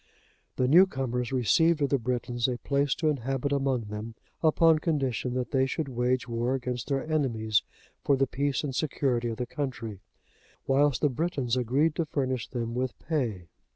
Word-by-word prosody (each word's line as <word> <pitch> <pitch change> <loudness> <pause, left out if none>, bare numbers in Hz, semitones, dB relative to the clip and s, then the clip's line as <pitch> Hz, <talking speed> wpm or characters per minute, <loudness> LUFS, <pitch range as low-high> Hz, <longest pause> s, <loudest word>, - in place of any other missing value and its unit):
The 125 - +1
newcomers 135 -7 +3
received 155 +6 +3
of 140 -2 +1
the 140 - +2
Britons 120 0 -1
a 125 -1 -2
place 140 +1 0
to 160 - -1
inhabit 135 0 -1
among 135 -3 +1
them, 105 +1 -7 0.3
upon 160 0 +4
condition 135 -6 -1
that 125 -1 -2
they 135 -2 +2
should 150 +1 -3
wage 125 +1 0
war 120 +2 0
against 125 -2 -4
their 135 -2 -1
enemies 115 -9 +1 0.4
for 140 - +3
the 135 - +3
peace 140 +2 -1
and 140 -3 -3
security 130 -4 0
of 115 -1 -3
the 125 - -2
country, 120 - -5 0.7
whilst 140 0 +2
the 150 - +4
Britons 135 -4 -1
agreed 130 +6 +2
to 165 - +1
furnish 130 -5 -2
them 115 -2 -4
with 125 0 -2
pay. 120 - -2
130 Hz, 170 wpm, -28 LUFS, 120-145 Hz, 0.7 s, upon